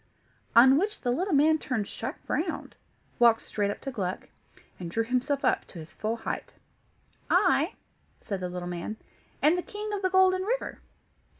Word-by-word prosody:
On 260 Hz, +4 st, +8 dB
which 420 Hz, +3 st, -2 dB
the 245 Hz, -, 0 dB
little 365 Hz, +10 st, -1 dB
man 310 Hz, +2 st, +4 dB
turned 225 Hz, -9 st, -2 dB
sharp 255 Hz, +5 st, -5 dB
round, 330 Hz, +2 st, -2 dB, 0.4 s
walked 235 Hz, -2 st, +5 dB
straight 205 Hz, -1 st, -1 dB
up 205 Hz, -, -5 dB
to 270 Hz, -, -4 dB
Gluck, 190 Hz, -6 st, -4 dB, 0.5 s
and 175 Hz, -2 st, -5 dB
drew 225 Hz, +7 st, 0 dB
himself 255 Hz, +4 st, 0 dB
up -, -, +2 dB
to -, -, -13 dB
his 160 Hz, 0 st, -9 dB
full 220 Hz, +2 st, -2 dB
height. 230 Hz, -, -5 dB, 0.7 s
"I," -, -, +3 dB, 0.4 s
said 200 Hz, -4 st, -4 dB
the 180 Hz, -1 st, -3 dB
little 180 Hz, 0 st, -5 dB
man, 180 Hz, +5 st, -4 dB, 0.5 s
"am 310 Hz, +4 st, +6 dB
the 360 Hz, -, -1 dB
King 420 Hz, +3 st, -6 dB
of 405 Hz, -, -2 dB
the 375 Hz, -, +1 dB
Golden 375 Hz, 0 st, +4 dB
River." 475 Hz, +6 st, -2 dB
255 Hz, 175 wpm, -28 LUFS, -, 0.7 s, On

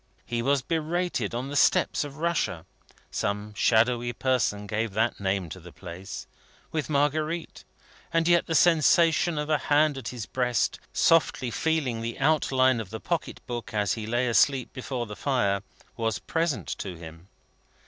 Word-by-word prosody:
He 120 Hz, -1 st, -2 dB
was 135 Hz, +2 st, +1 dB
berated 165 Hz, -, -1 dB
on 130 Hz, +3 st, -3 dB
the 145 Hz, -, -5 dB
steppes -, -, +3 dB
of 145 Hz, -1 st, -8 dB
Russia 160 Hz, -, -1 dB, 0.5 s
(some 105 Hz, +1 st, -2 dB
shadowy 120 Hz, +3 st, +2 dB
person 115 Hz, -5 st, 0 dB
gave 105 Hz, +1 st, -2 dB
that 115 Hz, +3 st, 0 dB
name 95 Hz, -2 st, -1 dB
to 95 Hz, -, -8 dB
the 90 Hz, 0 st, -12 dB
place) 90 Hz, +3 st, -8 dB, 0.5 s
with 155 Hz, -2 st, -2 dB
Marguerite; 155 Hz, +3 st, -1 dB, 0.5 s
and 165 Hz, 0 st, +2 dB
yet 175 Hz, -1 st, +4 dB
the 165 Hz, -, -1 dB
sensation 165 Hz, 0 st, +4 dB
of 150 Hz, 0 st, -2 dB
a 155 Hz, -2 st, +2 dB
hand 145 Hz, -1 st, +3 dB
at 120 Hz, -, -8 dB
his 120 Hz, -4 st, -5 dB
breast, 125 Hz, -1 st, 0 dB
softly 155 Hz, -6 st, +3 dB
feeling 145 Hz, -8 st, 0 dB
the 115 Hz, +1 st, -4 dB
outline 130 Hz, -4 st, +3 dB
of 110 Hz, -4 st, -6 dB
the 110 Hz, +2 st, -6 dB
packet 170 Hz, +6 st, -3 dB
book 120 Hz, -3 st, -5 dB
as 105 Hz, -2 st, +1 dB
he 110 Hz, -2 st, -5 dB
lay 120 Hz, +2 st, +1 dB
asleep 130 Hz, +2 st, +2 dB
before 130 Hz, -1 st, -4 dB
the 105 Hz, -2 st, -8 dB
fire, 100 Hz, -8 st, 0 dB, 0.3 s
was 115 Hz, -3 st, -1 dB
present 160 Hz, -, -1 dB
to 95 Hz, -3 st, -5 dB
him. 80 Hz, +1 st, -11 dB
125 Hz, 160 wpm, -27 LUFS, 105-150 Hz, 0.5 s, yet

